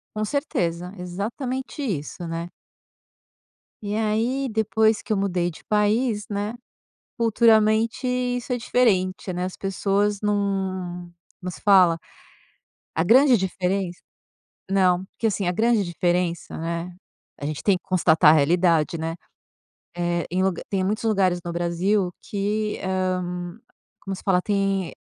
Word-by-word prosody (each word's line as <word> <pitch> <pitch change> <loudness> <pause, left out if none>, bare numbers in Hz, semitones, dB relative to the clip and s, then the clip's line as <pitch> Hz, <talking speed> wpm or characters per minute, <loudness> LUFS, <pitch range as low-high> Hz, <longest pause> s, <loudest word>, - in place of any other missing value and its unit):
Com 215 0 -1
certeza! 180 - -2
Exatamente 235 +10 -4
isso, 175 - -4
né. 165 +1 -4 1.3
E 205 +1 -2
aí, 230 +5 0
depois 220 0 +2
que 215 - -2
eu - - +1
mudei 180 -3 0
de 160 - -12
país, 210 +1 +1
né, 205 +2 -2 0.7
culturalmente 225 +1 +3
isso 250 0 -1
é 250 - +1
diferente, 195 -6 +1
né, 180 0 -3
as 185 0 -4
pessoas 200 +1 0
não 190 -4 -2 0.3
não 180 0 -5
se - - -12
fala. 185 -5 +5 1.0
A - - +2
grande 255 +6 +6
diferença 185 -1 -2 0.7
Não, 185 -2 +3
porque 225 +3 -3
assim, 200 -2 -1
a 180 - +2
grande 225 +2 +2
diferença, 175 0 -1
né, 170 +2 -4 0.4
a 145 - -6
gente 150 -1 -3
tem 200 - +3
que - - -26
constatar 165 -4 +5
a - - +5
realidade, 165 +1 +2
né, 165 +1 -3 0.8
eh, 175 -1 0
em 185 - +1
luga 190 -2 0
tem 195 -2 0
muitos 210 +4 -1
lugares 190 -5 +2
no 175 - -4
Brasil 175 +3 0
que, 210 +1 -2
hã, 185 0 -2 0.4
como 195 -1 -4
se - - -12
fala? 180 -2 +3
Tem 195 -3 0
190 Hz, 135 wpm, -24 LUFS, 175-215 Hz, 1.3 s, grande